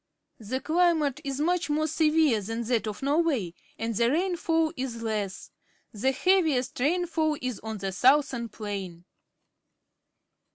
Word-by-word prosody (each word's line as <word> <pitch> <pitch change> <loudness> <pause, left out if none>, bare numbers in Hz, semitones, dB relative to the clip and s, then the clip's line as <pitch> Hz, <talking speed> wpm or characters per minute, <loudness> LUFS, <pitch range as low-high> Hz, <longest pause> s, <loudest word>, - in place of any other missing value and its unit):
The 235 +4 -3
climate 310 -2 +1
is 275 -1 -3
much 345 +2 0
more 305 +1 +1
severe 310 -6 +3
than 225 +4 -4
that 230 -1 0
of 210 +4 -5
Norway, 280 - +1 0.2
and 230 0 -2
the 235 +2 +3
rainfall 325 0 +1
is 250 -4 -4
less. 210 -4 -3 0.4
The 240 +5 +1
heaviest 290 -6 +1
rainfall 315 +1 +1
is 255 -4 -4
on 220 0 -5
the 195 -1 -3
southern 255 +1 +3
plain. 195 -5 -6
265 Hz, 130 wpm, -27 LUFS, 225-315 Hz, 0.4 s, severe